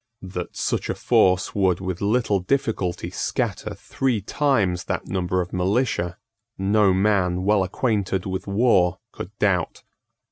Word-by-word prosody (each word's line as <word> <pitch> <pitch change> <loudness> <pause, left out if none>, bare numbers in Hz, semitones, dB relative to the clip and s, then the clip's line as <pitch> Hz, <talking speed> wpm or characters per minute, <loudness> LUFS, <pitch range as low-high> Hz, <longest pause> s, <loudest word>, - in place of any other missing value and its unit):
That 90 -2 -6
such - - -1
a - - -1
force 90 0 +2
would 95 -3 +2
with 95 -2 -4
little 105 -1 +1
difficulty 95 -4 -1
scatter - - -2
three 130 -5 -1
times 100 - 0
that - - -3
number 90 -1 -1
of 90 - -7
militia, 95 -1 0 0.4
no 100 +1 +3
man 95 -2 +1
well 100 0 +3
acquainted 95 -1 -1
with 95 0 -4
war 100 -4 +3
could 90 - -7
doubt. 90 -5 0
95 Hz, 135 wpm, -23 LUFS, 90-105 Hz, 0.4 s, no